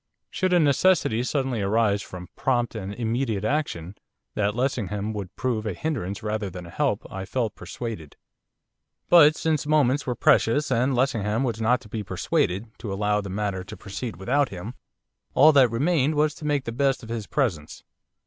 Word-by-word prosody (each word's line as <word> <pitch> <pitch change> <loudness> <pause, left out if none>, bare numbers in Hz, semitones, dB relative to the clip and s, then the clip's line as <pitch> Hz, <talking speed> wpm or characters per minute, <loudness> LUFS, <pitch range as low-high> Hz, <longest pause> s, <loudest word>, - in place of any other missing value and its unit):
Should 185 -1 0
a 180 - +5
necessity 150 -5 +3
suddenly 130 -3 -1
arise 105 0 +2
for 90 -2 -8
prompt 120 -2 0
and 100 -3 -5
immediate 115 -1 -2
action, 105 - -2 0.4
that 105 0 0
Lessingham 110 -5 -1
would 100 -2 -6
prove 115 -4 -2
a 105 - -1
hindrance 110 - -3
rather 105 -2 -2
than 90 -1 -8
a 85 - -11
help - - -1
I 95 0 -5
felt 110 +2 -2
persuaded. 110 -14 -7 0.9
But 155 -3 +7
since 155 -3 -1
moments 145 -2 +2
were 125 - -1
precious, 135 +6 +3
and 130 +2 +2
Lessingham 115 -3 +1
was 115 -4 -2
not 120 +3 +2
to - - -14
be 110 +1 -4
persuaded 95 0 -1
to 110 -4 -5
allow 105 +1 0
the 100 - -7
matter 100 -1 -2
to - - -10
proceed 100 +2 -6
without 130 +9 +1
him, 100 +5 -7 0.6
all 155 +3 +8
that 135 -4 +5
remained 145 +4 +1
was 150 0 +2
to 150 - -10
make 145 -2 +1
the 115 - -4
best 135 +1 0
of 115 - -10
his 115 -3 -4
presence. 100 - -2
115 Hz, 175 wpm, -25 LUFS, 100-135 Hz, 0.9 s, all